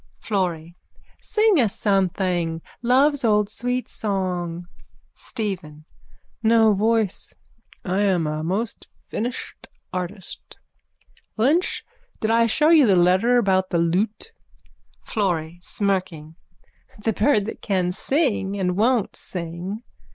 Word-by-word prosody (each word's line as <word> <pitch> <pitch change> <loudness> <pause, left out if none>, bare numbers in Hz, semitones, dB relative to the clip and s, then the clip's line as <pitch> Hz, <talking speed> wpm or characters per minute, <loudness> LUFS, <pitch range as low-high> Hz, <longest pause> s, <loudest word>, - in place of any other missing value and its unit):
_ - - -21
FLORRY: 175 -5 -2 0.5
Sing 430 -5 +3
us 225 -6 +1
something. 180 -4 0 0.2
Love's 270 +4 +3
old 210 -2 +3
sweet 245 +2 -2
song. 180 -4 -3 0.5
STEPHEN: 175 -9 -5 0.6
No 225 -1 +5
voice. 220 0 0 0.5
I 190 +1 0
am 185 -5 +2
a 155 0 -2
most 200 +7 -3 0.2
finished 245 +3 -5 0.3
artist. 180 +1 -5 0.8
Lynch, 290 +11 +1 0.3
did 220 - 0
I 230 0 +4
show 300 +7 +3
you 310 -6 +6
the 195 - +5
letter 185 +8 +4
about 190 -4 +2
the 170 - 0
lute? 190 - 0 0.7
FLORRY: 175 -5 -2
(Smirking.) 180 -6 -1 0.7
The 225 - +1
bird 210 -1 +2
that 225 - -7
can 185 -3 0
sing 205 - 0
and 180 -2 0
won't 225 +1 +1
sing. 180 +5 -6
200 Hz, 115 wpm, -23 LUFS, 180-230 Hz, 0.8 s, you